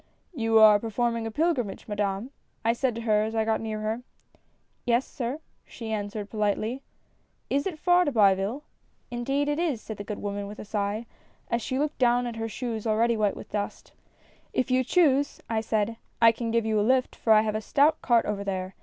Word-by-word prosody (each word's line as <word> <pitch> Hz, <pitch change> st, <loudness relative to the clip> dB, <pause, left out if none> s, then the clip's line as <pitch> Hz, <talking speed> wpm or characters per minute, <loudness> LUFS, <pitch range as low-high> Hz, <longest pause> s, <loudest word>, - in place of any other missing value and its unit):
"'You 225 Hz, -6 st, +2 dB
are 215 Hz, -1 st, +8 dB
performing 230 Hz, +1 st, -1 dB
a -, -, -3 dB
pilgrimage, 270 Hz, -, -1 dB
Madame?' 205 Hz, +3 st, -2 dB, 0.3 s
I 230 Hz, -, +4 dB
said 245 Hz, -1 st, -1 dB
to 230 Hz, -, -4 dB
her 215 Hz, -2 st, +2 dB
as 220 Hz, +1 st, -2 dB
I 220 Hz, -1 st, +1 dB
got 220 Hz, 0 st, 0 dB
near 215 Hz, -1 st, -4 dB
her. 220 Hz, +3 st, -2 dB, 0.3 s
" -, -, -36 dB
' -, -, -44 dB
Yes, 240 Hz, +2 st, +3 dB
sir,' 255 Hz, +5 st, -4 dB, 0.2 s
she 225 Hz, -3 st, -8 dB
answered, 205 Hz, -1 st, -3 dB
politely. 215 Hz, +4 st, -1 dB, 0.2 s
" -, -, -41 dB
' -, -, -44 dB
Is 280 Hz, +4 st, +1 dB
it 350 Hz, -5 st, -4 dB
far 355 Hz, +2 st, +4 dB
to 290 Hz, -, 0 dB
Biville? 205 Hz, +3 st, +2 dB
' -, -, -43 dB
" -, -, -43 dB
' -, -, -41 dB
Indeed 270 Hz, +4 st, -1 dB
it 295 Hz, +1 st, 0 dB
is,' 315 Hz, -9 st, 0 dB
said 220 Hz, -1 st, -8 dB
the 205 Hz, -, -5 dB
good 205 Hz, 0 st, -5 dB
woman, 200 Hz, 0 st, -4 dB
with 210 Hz, +1 st, -9 dB
a -, -, -8 dB
sigh, 210 Hz, +2 st, -2 dB, 0.5 s
as 235 Hz, -, +1 dB
she 260 Hz, -, -2 dB
looked 300 Hz, +2 st, -1 dB
down 245 Hz, -1 st, +3 dB
at 235 Hz, -2 st, -5 dB
her 225 Hz, 0 st, -3 dB
shoes 230 Hz, -1 st, -4 dB
already 230 Hz, +2 st, +2 dB
white 210 Hz, -2 st, +1 dB
with -, -, -11 dB
dust. 205 Hz, -1 st, -4 dB, 0.2 s
" -, -, -32 dB
' -, -, -35 dB
If 255 Hz, -, 0 dB
you 255 Hz, 0 st, +3 dB
choose,' 285 Hz, -2 st, +2 dB
I 225 Hz, -1 st, 0 dB
said, 220 Hz, 0 st, -1 dB
' -, -, -42 dB
I 230 Hz, 0 st, +7 dB
can 230 Hz, 0 st, -4 dB
give 230 Hz, 0 st, +1 dB
you 220 Hz, -1 st, +1 dB
a -, -, +3 dB
lift, 255 Hz, +4 st, +2 dB
for 225 Hz, -, 0 dB
I 215 Hz, -1 st, +8 dB
have 215 Hz, -1 st, -1 dB
a 215 Hz, -, -2 dB
stout 290 Hz, +8 st, +3 dB
cart 235 Hz, -2 st, +3 dB
over 200 Hz, -1 st, -2 dB
there. 190 Hz, -1 st, -3 dB
225 Hz, 240 wpm, -27 LUFS, 215-255 Hz, 0.5 s, are